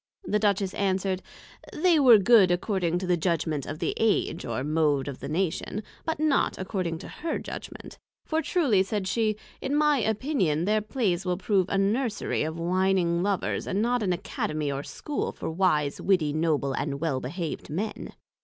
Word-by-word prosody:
The 210 Hz, -, 0 dB
Duchess 200 Hz, -2 st, +1 dB
answer'd, 190 Hz, -1 st, 0 dB, 0.5 s
They 335 Hz, 0 st, +3 dB
were 250 Hz, -5 st, +8 dB
Good 205 Hz, -2 st, +6 dB
according 175 Hz, -1 st, 0 dB
to 185 Hz, -, -3 dB
the 180 Hz, -1 st, +2 dB
Judgment 160 Hz, -4 st, -1 dB
of 155 Hz, -, -5 dB
the -, -, -1 dB
Age, 225 Hz, -2 st, +1 dB
or 120 Hz, +2 st, -2 dB
Mode 150 Hz, -2 st, +1 dB
of 140 Hz, -2 st, -6 dB
the 140 Hz, -, -6 dB
Nation, 190 Hz, +5 st, -2 dB, 0.2 s
but 320 Hz, -2 st, -2 dB
not 305 Hz, -2 st, +2 dB
according 185 Hz, -3 st, -3 dB
to -, -, -9 dB
her 330 Hz, 0 st, -3 dB
Judgment: -, -, -8 dB, 0.3 s
for 320 Hz, 0 st, 0 dB
truly, 285 Hz, -, +2 dB
said 195 Hz, 0 st, -2 dB
she, 215 Hz, +1 st, +1 dB, 0.3 s
in 275 Hz, +2 st, -1 dB
my 300 Hz, -2 st, +3 dB
Opinion, 215 Hz, -, 0 dB
their 215 Hz, +2 st, +2 dB
Plays 210 Hz, -5 st, -1 dB
will 180 Hz, -1 st, -1 dB
prove 195 Hz, -1 st, +1 dB
a 195 Hz, -, 0 dB
Nursery 215 Hz, +3 st, 0 dB
of 160 Hz, +1 st, -2 dB
whining 175 Hz, 0 st, +1 dB
Lovers, 195 Hz, 0 st, -1 dB
and 195 Hz, -, -1 dB
not 240 Hz, +2 st, +1 dB
an 195 Hz, -3 st, 0 dB
Academy 155 Hz, -4 st, -2 dB
or 140 Hz, 0 st, -3 dB
School 290 Hz, -, -4 dB
for -, -, -5 dB
Wise, 160 Hz, -5 st, +1 dB
Witty, 175 Hz, -7 st, +2 dB
Noble 155 Hz, -4 st, 0 dB
and 140 Hz, 0 st, -2 dB
well 150 Hz, -4 st, 0 dB
behaved 160 Hz, +6 st, -5 dB
men. 200 Hz, +8 st, -4 dB
190 Hz, 175 wpm, -27 LUFS, 160-215 Hz, 0.5 s, were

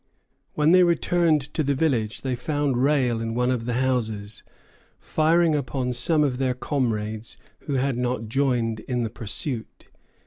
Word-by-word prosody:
When 150 Hz, +1 st, +3 dB
they 185 Hz, +1 st, +7 dB
returned 170 Hz, -2 st, +3 dB
to -, -, 0 dB
the 140 Hz, -1 st, +1 dB
village 125 Hz, -7 st, 0 dB
they 130 Hz, -2 st, -2 dB
found 145 Hz, +1 st, -1 dB
Rale 130 Hz, -5 st, +2 dB
in 115 Hz, 0 st, -3 dB
one 125 Hz, +1 st, +1 dB
of 120 Hz, -3 st, -2 dB
the 120 Hz, -, -2 dB
houses, 110 Hz, -5 st, -1 dB, 0.6 s
firing 165 Hz, +1 st, +2 dB
upon 130 Hz, -3 st, -1 dB
some 150 Hz, +5 st, +2 dB
of 130 Hz, -3 st, -1 dB
their 130 Hz, -2 st, 0 dB
comrades 110 Hz, -5 st, -2 dB, 0.3 s
who 145 Hz, -, -1 dB
had 130 Hz, -1 st, 0 dB
not 125 Hz, -2 st, -2 dB
joined 120 Hz, -3 st, 0 dB
in 125 Hz, +1 st, -2 dB
the 110 Hz, -, -3 dB
pursuit. 115 Hz, -, -5 dB
125 Hz, 160 wpm, -24 LUFS, 115-145 Hz, 0.6 s, they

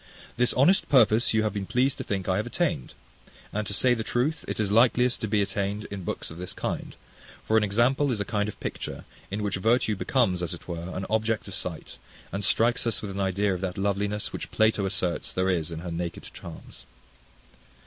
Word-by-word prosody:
This 125 Hz, +1 st, +3 dB
honest 175 Hz, +9 st, +4 dB
purpose 115 Hz, -4 st, +5 dB
you 110 Hz, 0 st, +2 dB
have 105 Hz, -2 st, 0 dB
been 100 Hz, -2 st, -3 dB
pleased 125 Hz, +3 st, +1 dB
to -, -, -2 dB
think 95 Hz, -2 st, -3 dB
I 95 Hz, -1 st, +2 dB
have 105 Hz, -, -1 dB
attained: 65 Hz, -, -1 dB, 0.6 s
and 105 Hz, -1 st, -2 dB
to -, -, -2 dB
say 125 Hz, +5 st, +4 dB
the 115 Hz, -, -2 dB
truth, 130 Hz, +8 st, 0 dB
it -, -, -3 dB
is 105 Hz, -2 st, +1 dB
likeliest 125 Hz, +2 st, +4 dB
to 110 Hz, -, -1 dB
be 105 Hz, -1 st, +2 dB
attained 100 Hz, +1 st, -2 dB
in 100 Hz, -2 st, -5 dB
books -, -, -4 dB
of 80 Hz, -, -9 dB
this 90 Hz, -, -3 dB
kind; -, -, -4 dB, 0.5 s
for 110 Hz, -, +2 dB
an 110 Hz, -, +5 dB
example 120 Hz, +7 st, +2 dB
is 115 Hz, -, -1 dB
a 105 Hz, -, -1 dB
kind 105 Hz, -2 st, -1 dB
of -, -, -10 dB
picture, -, -, -5 dB, 0.2 s
in 105 Hz, +2 st, -3 dB
which 100 Hz, -1 st, -1 dB
virtue 110 Hz, +2 st, +2 dB
becomes, 95 Hz, -4 st, +1 dB
as 90 Hz, 0 st, -2 dB
it -, -, -15 dB
were, 85 Hz, 0 st, -5 dB
an 95 Hz, -, -3 dB
object 110 Hz, 0 st, 0 dB
of 100 Hz, -, -7 dB
sight, 90 Hz, -4 st, -5 dB, 0.3 s
and 100 Hz, +1 st, -3 dB
strikes 115 Hz, +4 st, +3 dB
us 115 Hz, -, 0 dB
with 100 Hz, -, -4 dB
an 95 Hz, -, -5 dB
idea 100 Hz, +1 st, +1 dB
of 90 Hz, -, -4 dB
that 95 Hz, -2 st, -3 dB
loveliness, 100 Hz, +1 st, -1 dB
which -, -, -5 dB
Plato 110 Hz, -2 st, +2 dB
asserts 90 Hz, -4 st, -2 dB
there 95 Hz, +1 st, +1 dB
is 85 Hz, -2 st, -1 dB
in 80 Hz, 0 st, -5 dB
her 90 Hz, -1 st, -5 dB
naked 85 Hz, 0 st, -4 dB
charms. 85 Hz, -2 st, -10 dB
105 Hz, 220 wpm, -27 LUFS, 95-115 Hz, 0.6 s, purpose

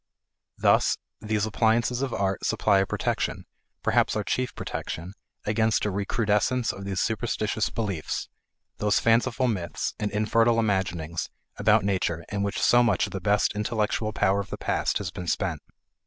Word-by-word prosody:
Thus -, -, +3 dB, 0.2 s
these 105 Hz, -1 st, 0 dB
appliances 115 Hz, +3 st, +1 dB
of 135 Hz, -2 st, -1 dB
art 95 Hz, -3 st, -1 dB
supply 100 Hz, -2 st, +3 dB
a 95 Hz, -, +1 dB
protection, -, -, -2 dB, 0.4 s
perhaps -, -, +2 dB
our 105 Hz, -, 0 dB
chief 125 Hz, +5 st, -2 dB
protection, 85 Hz, +4 st, -5 dB, 0.3 s
against 110 Hz, 0 st, +2 dB
a 105 Hz, -, 0 dB
recrudescence 105 Hz, +4 st, +1 dB
of 100 Hz, 0 st, -8 dB
these 95 Hz, -2 st, -2 dB
superstitious 110 Hz, -1 st, -1 dB
beliefs, 100 Hz, -8 st, -3 dB, 0.5 s
those 105 Hz, 0 st, +2 dB
fanciful 115 Hz, +2 st, +2 dB
myths 95 Hz, -7 st, -2 dB
and 105 Hz, -, -1 dB
infertile 115 Hz, +3 st, +2 dB
imaginings 90 Hz, -7 st, -1 dB, 0.3 s
about -, -, +3 dB
nature 90 Hz, -4 st, -1 dB
in 100 Hz, -1 st, -1 dB
which 100 Hz, 0 st, -1 dB
so 120 Hz, -, +5 dB
much 115 Hz, -6 st, +2 dB
of -, -, -8 dB
the 95 Hz, -, -4 dB
best 100 Hz, +2 st, +2 dB
intellectual 105 Hz, 0 st, -1 dB
power 100 Hz, -2 st, +2 dB
of 100 Hz, -1 st, -5 dB
the -, -, -5 dB
past -, -, 0 dB
has 95 Hz, -5 st, -4 dB
been 90 Hz, +1 st, -7 dB
spent. -, -, -1 dB
105 Hz, 155 wpm, -26 LUFS, 95-115 Hz, 0.5 s, so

